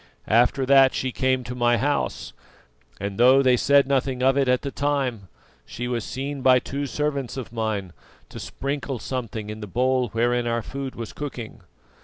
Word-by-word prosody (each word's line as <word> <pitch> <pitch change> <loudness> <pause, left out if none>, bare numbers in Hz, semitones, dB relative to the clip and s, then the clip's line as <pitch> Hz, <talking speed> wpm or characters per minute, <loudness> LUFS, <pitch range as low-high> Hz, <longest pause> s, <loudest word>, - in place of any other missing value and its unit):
After 125 +4 +3
that 135 0 +5
she 130 - -1
came 130 0 0
to 120 +1 -6
my 120 -1 +2
house, 145 +4 -2 0.7
and 100 +1 -5
though 130 +3 +6
they 130 -1 +5
said 140 +3 +4
nothing 130 -2 0
of 135 +1 +4
it 140 -1 +2
at 125 0 +2
the 140 - -3
time, 135 -9 -1 0.4
she 125 - -6
was 120 -2 -2
seen 140 +2 -5
by 130 0 +6
two 140 +3 -3
servants 140 -3 -2
of 125 -3 -7
mine 105 -6 -3 0.4
to - - -9
sprinkle 140 -1 -4
something 115 -4 -5
in 105 - -7
the 105 - -7
bowl 125 +3 +1
wherein 120 +2 0
our 115 -1 -1
food 135 -1 -6
was 115 -2 -7
cooking. 120 -6 -7
125 Hz, 180 wpm, -24 LUFS, 120-135 Hz, 0.7 s, though